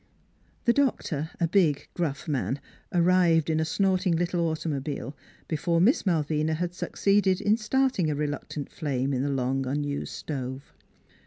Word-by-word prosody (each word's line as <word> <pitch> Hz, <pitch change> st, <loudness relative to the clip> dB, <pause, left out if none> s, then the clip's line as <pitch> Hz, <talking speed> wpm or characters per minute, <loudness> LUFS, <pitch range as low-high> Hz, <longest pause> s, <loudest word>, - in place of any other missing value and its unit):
The 235 Hz, -, +5 dB
doctor, 205 Hz, -, 0 dB
a 170 Hz, -, +2 dB
big, 165 Hz, -6 st, +2 dB
gruff 155 Hz, -5 st, -3 dB
man, 140 Hz, -2 st, -1 dB, 0.3 s
arrived 170 Hz, -2 st, +3 dB
in 155 Hz, -, +1 dB
a -, -, +2 dB
snort 190 Hz, +3 st, +1 dB
ing 170 Hz, -, +3 dB
little 175 Hz, +1 st, 0 dB
automobile 150 Hz, -2 st, -3 dB, 0.3 s
before 165 Hz, +2 st, 0 dB
Miss 220 Hz, -, +3 dB
Malvina 155 Hz, -2 st, +1 dB
had 175 Hz, +2 st, -2 dB
succeeded 195 Hz, 0 st, +1 dB
in 210 Hz, +1 st, +3 dB
starting 230 Hz, -5 st, +1 dB
a 150 Hz, -, 0 dB
reluctant 145 Hz, 0 st, -4 dB
flame 140 Hz, -3 st, -1 dB
in 130 Hz, -, 0 dB
the 140 Hz, -, 0 dB
long 135 Hz, 0 st, 0 dB
unused 145 Hz, +1 st, -2 dB
stove. 130 Hz, -2 st, -5 dB
160 Hz, 150 wpm, -27 LUFS, 145-185 Hz, 0.3 s, The